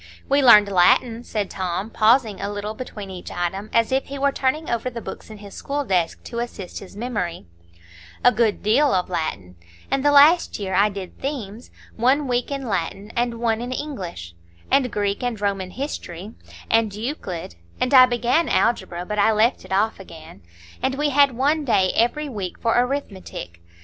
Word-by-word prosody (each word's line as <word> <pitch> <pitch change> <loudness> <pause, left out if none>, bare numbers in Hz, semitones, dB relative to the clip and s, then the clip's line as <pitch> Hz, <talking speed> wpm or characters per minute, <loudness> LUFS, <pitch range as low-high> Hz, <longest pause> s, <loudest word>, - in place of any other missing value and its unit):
"We 280 +1 +3
learned 215 -6 +8
Latin," 225 +5 +3
said 210 -4 -3
Tom, 185 +3 -3
pausing 220 -1 +3
a 200 - -3
little 205 +1 -4
between 210 -4 -8
each 180 -1 -8
item, 190 +4 -3
as 230 +1 +2
if 265 +1 +1
he 280 - -6
were 280 0 +2
turning 275 +4 -1
over 235 +1 -1
the 235 -1 -7
books - - -9
in 215 - -10
his 200 -1 -12
school 285 0 -3
desk 180 -6 0
to 235 - -6
assist 220 -6 -6
his 195 0 -12
memory,—"a 85 - -3
good 220 -2 0
deal 245 +5 +3
of 185 0 -1
Latin; 95 - -4 0.3
and 270 0 +1
the 290 - +4
last 295 +5 +5
year 195 -2 -4
I 200 +3 +4
did 195 -2 -8
Themes, 240 -6 -5 0.3
one 265 +5 +2
week 245 -1 -1
in 275 -2 -4
Latin 195 +2 -3
and 240 0 0
one 230 -1 0
in 245 +1 -5
English; 185 - -6 0.4
and 255 -4 +3
Greek 205 -1 -1
and 245 -3 -2
Roman 195 -2 -2
history; 210 - -6 0.3
and 225 -2 +2
Euclid; 210 - -5 0.3
and 255 - 0
I 255 -1 +9
began 245 +7 +1
Algebra, 185 -6 0
but 210 +2 -3
I 210 +2 +4
left 220 +4 +1
it - - -14
off 205 +3 +1
again; 165 -2 -12 0.4
and 265 0 0
we 295 +1 0
had 280 -3 +4
one 295 +4 +1
day 190 -8 +2
every 295 +6 +1
week 200 -9 -5
for 230 -1 +1
Arithmetic. 230 - -3
220 Hz, 180 wpm, -22 LUFS, 190-255 Hz, 0.4 s, I